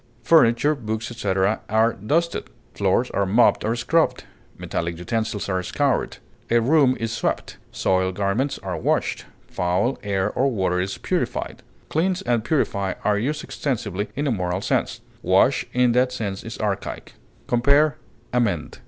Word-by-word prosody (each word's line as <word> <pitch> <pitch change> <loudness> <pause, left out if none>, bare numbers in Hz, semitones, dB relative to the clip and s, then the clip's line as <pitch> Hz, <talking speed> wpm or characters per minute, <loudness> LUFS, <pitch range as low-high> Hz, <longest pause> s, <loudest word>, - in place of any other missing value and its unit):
Furniture, 130 0 +4
books, 110 -4 -4
etc., 100 -2 0
are 110 +2 +3
dusted; 160 - -1 0.3
floors 100 +5 +1
are 100 -1 0
mopped 110 +6 +4
or 115 +2 0
scrubbed; 155 +8 +1 0.3
metallic 85 0 -3
utensils 110 +3 -2
are 95 -2 0
scoured; 135 +9 0 0.3
a 120 - +4
room 130 +1 +3
is 115 0 -2
swept; - - -2
soiled 95 0 0
garments 105 +8 0
are - - -3
washed; - - -1 0.2
foul 90 +8 0
air 100 -2 -1
or 135 +2 +1
water 95 -6 0
is 95 +1 -3
purified. - - -2 0.3
Cleanse 185 +4 0
and 120 -2 +1
purify 100 - 0
are 105 -1 +2
used 150 +7 -2
extensively 110 -7 -3
in 145 - -1
a 140 - +1
moral 90 -3 -1
sense; - - -1 0.2
wash - - +3
in 125 -1 +3
that 125 +1 +2
sense 105 -6 -4
is 115 - -7
archaic. 105 -3 -3 0.3
Compare 140 +5 +3 0.4
AMEND. 105 -11 0
115 Hz, 145 wpm, -23 LUFS, 100-130 Hz, 0.4 s, Furniture